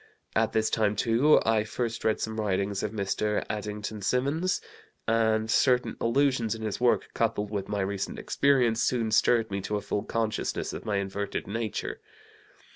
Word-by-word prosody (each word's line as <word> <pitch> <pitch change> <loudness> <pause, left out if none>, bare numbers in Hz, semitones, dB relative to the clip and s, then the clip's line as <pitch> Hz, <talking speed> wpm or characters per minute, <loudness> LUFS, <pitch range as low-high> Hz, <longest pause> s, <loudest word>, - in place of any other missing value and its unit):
At - - +2
this 110 0 +1
time, 105 -2 +2
too, 120 +8 +4
I 110 -1 +3
first 115 +1 -3
read 110 - +1
some 110 0 -3
writings 100 -1 -1
of - - -1
Mr. 105 0 -1
Addington 105 0 -5
Symonds, 140 - +1 0.5
and 110 -1 +2
certain 125 +2 +2
allusions 120 -2 +2
in 110 - -8
his 110 +1 -3
work, 125 -1 +2
coupled 105 -2 -1
with 100 -2 -3
my 100 -1 -1
recent 95 0 -3
experience, 125 -5 +2
soon 115 -3 +1
stirred 115 0 +3
me 100 0 -2
to 105 - -3
a - - -4
full 105 - -2
consciousness 110 0 -2
of - - -7
my 105 -2 -1
inverted 100 +1 -2
nature. 110 0 -4
110 Hz, 165 wpm, -28 LUFS, 105-115 Hz, 0.5 s, too